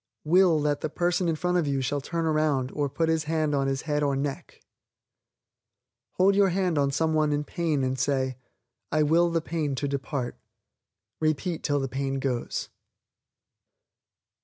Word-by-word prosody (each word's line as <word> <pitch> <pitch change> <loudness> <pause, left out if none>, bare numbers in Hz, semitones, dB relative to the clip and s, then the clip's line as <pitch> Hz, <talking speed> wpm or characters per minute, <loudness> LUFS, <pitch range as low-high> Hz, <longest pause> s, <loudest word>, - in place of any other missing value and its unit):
Will 175 0 +4
that 145 -1 0
the 155 - -2
person 175 +2 0
in 165 - +1
front 180 +2 +1
of 160 - -1
you 140 -1 0
shall 140 +2 -1
turn 165 +3 -2
around 155 -4 +1
or 145 -1 -1
put 165 +4 0
his 160 -1 +1
hand 155 -1 0
on 135 -1 +1
his 135 0 -1
head 150 -1 -1
or 140 -2 +1
neck. 140 0 -4 1.5
Hold 195 +2 +3
your 200 -1 +4
hand 180 -4 0
on 140 -1 +2
some 160 +3 0
one 155 -1 +2
in 145 0 0
pain 155 -3 -1
and 130 0 -1
say, 130 -1 0 0.6
"I 155 0 +3
will 170 +3 +3
the 165 -1 0
pain 155 -4 -2
to 140 +2 -2
depart." 140 -2 -3 0.8
Repeat 155 +2 -1
till 145 -2 0
the 135 - -2
pain 135 +1 -2
goes. 130 -3 -2
150 Hz, 170 wpm, -27 LUFS, 140-165 Hz, 1.5 s, Will